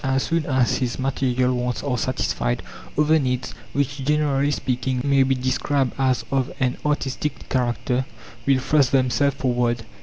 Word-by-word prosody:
As 135 0 +1
soon 165 -2 -1
as 130 -3 +2
his 125 -2 -2
material 130 -1 +1
wants 125 0 -2
are 140 -3 0
satisfied, 65 - -1 0.3
other 155 +1 +4
needs, 125 -2 -2 0.2
which, 140 0 -1
generally 145 -1 +2
speaking, 130 -2 -1
may 140 -1 +3
be 135 0 +3
described 130 +1 0
as 130 -3 +1
of 135 -1 0
an 130 -2 0
artistic 150 0 -2
character, 125 0 0 0.4
will 135 -1 +5
thrust 135 0 +2
themselves 130 +1 +2
forward. 120 -2 0
130 Hz, 150 wpm, -23 LUFS, 125-140 Hz, 0.4 s, will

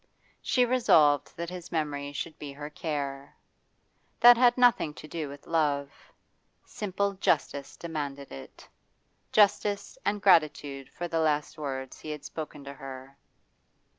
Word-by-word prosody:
She 250 -1 +2
resolved 160 - +3
that 170 +1 -4
his 180 -1 -8
memory 145 -3 -2
should 155 +3 -6
be 145 -2 -7
her 145 +1 -8
care. 140 -3 -4 0.8
That 240 0 +9
had 245 0 +4
nothing 240 -11 +3
to 155 - -10
do 155 -1 -4
with 140 0 -11
love; 145 -4 0 0.7
simple 200 0 -2
justice 145 -6 -1
demanded 145 -4 -5
it. 70 - -11 0.6
Justice 205 - +2
and 205 - 0
gratitude 150 -7 +2
for 175 - -5
the 165 -1 -1
last 150 -2 0
words 135 -3 -5
he 155 - -9
had 150 -1 -6
spoken 150 -2 -7
to 140 0 -8
her. 135 0 -10
150 Hz, 135 wpm, -28 LUFS, 140-180 Hz, 0.8 s, That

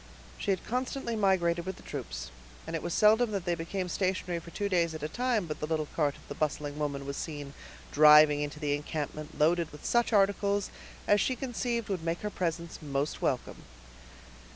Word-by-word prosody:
She 195 - +1
constantly 250 +3 -3
migrated 175 -5 +2
with 190 - -3
the - - -15
troops; - - -6 0.3
and 165 - -4
it 160 - -2
was 175 - -4
seldom 220 +5 +5
that 195 -3 -2
they 175 - +1
became 175 +3 -3
stationary 185 -1 -1
for 170 - -12
two 205 +4 -2
days 170 -4 +1
at 155 - -7
a - - 0
time 240 +1 0
but 155 -2 -5
the 150 - -3
little 155 -1 0
cart 145 -3 +1
of - - -17
the - - -5
bustling 150 -1 -2
woman 140 -2 -2
was 140 0 -4
seen 145 -3 -5 0.4
driving 150 0 +7
into 150 +1 -4
the 145 -2 0
encampment 150 0 -4
loaded 165 +1 +2
with 150 - -12
such 240 0 +2
articles 200 -1 +2 0.4
as 205 -1 +5
she 255 - +1
conceived 240 -3 -2
would 185 -5 -2
make 165 +1 -2
her 210 - -3
presence 170 -2 -3
most 140 0 -2
welcome. - - -1
170 Hz, 195 wpm, -30 LUFS, 150-200 Hz, 0.4 s, driving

